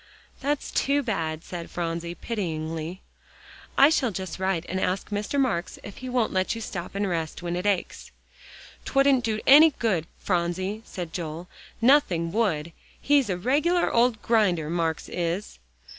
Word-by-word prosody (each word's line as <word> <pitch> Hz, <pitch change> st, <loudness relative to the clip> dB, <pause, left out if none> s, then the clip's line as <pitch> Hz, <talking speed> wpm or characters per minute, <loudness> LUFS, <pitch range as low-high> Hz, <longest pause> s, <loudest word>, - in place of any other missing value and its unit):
"That's 285 Hz, +1 st, -2 dB
too 285 Hz, +1 st, +1 dB
bad," 165 Hz, -8 st, -2 dB
said 170 Hz, -2 st, -7 dB
Phronsie 170 Hz, 0 st, -3 dB
pityingly, 165 Hz, -5 st, -4 dB, 0.7 s
"I 280 Hz, +3 st, +7 dB
shall 265 Hz, -6 st, +2 dB
just 190 Hz, -3 st, -5 dB
write 190 Hz, -3 st, 0 dB
and 185 Hz, -, -2 dB
ask 185 Hz, +2 st, -1 dB
Mr. 210 Hz, +7 st, -1 dB
Marks 230 Hz, -11 st, 0 dB
if 200 Hz, -, -9 dB
he 255 Hz, -, -6 dB
won't 245 Hz, -3 st, 0 dB
let 185 Hz, +3 st, 0 dB
you -, -, -5 dB
stop 180 Hz, -3 st, -6 dB
and 200 Hz, 0 st, 0 dB
rest 165 Hz, -1 st, -3 dB
when 175 Hz, 0 st, -2 dB
it 180 Hz, +3 st, -2 dB
aches." 195 Hz, -3 st, -1 dB, 0.7 s
"'Twouldn't 275 Hz, -2 st, +3 dB
do 220 Hz, -2 st, -1 dB
any 300 Hz, +2 st, +8 dB
good, 185 Hz, -9 st, 0 dB
Phronsie," 185 Hz, +3 st, -1 dB
said 175 Hz, -3 st, -7 dB
Joel, 165 Hz, 0 st, -5 dB, 0.3 s
"nothing 210 Hz, -, +3 dB
would. 170 Hz, -7 st, 0 dB, 0.3 s
He's 285 Hz, -5 st, +3 dB
a 180 Hz, -, 0 dB
regular 295 Hz, -, +1 dB
old 235 Hz, -1 st, +3 dB
grinder, 180 Hz, -9 st, +2 dB
Marks 165 Hz, -2 st, -1 dB
is." 175 Hz, -, -3 dB
190 Hz, 155 wpm, -26 LUFS, 170-240 Hz, 0.7 s, any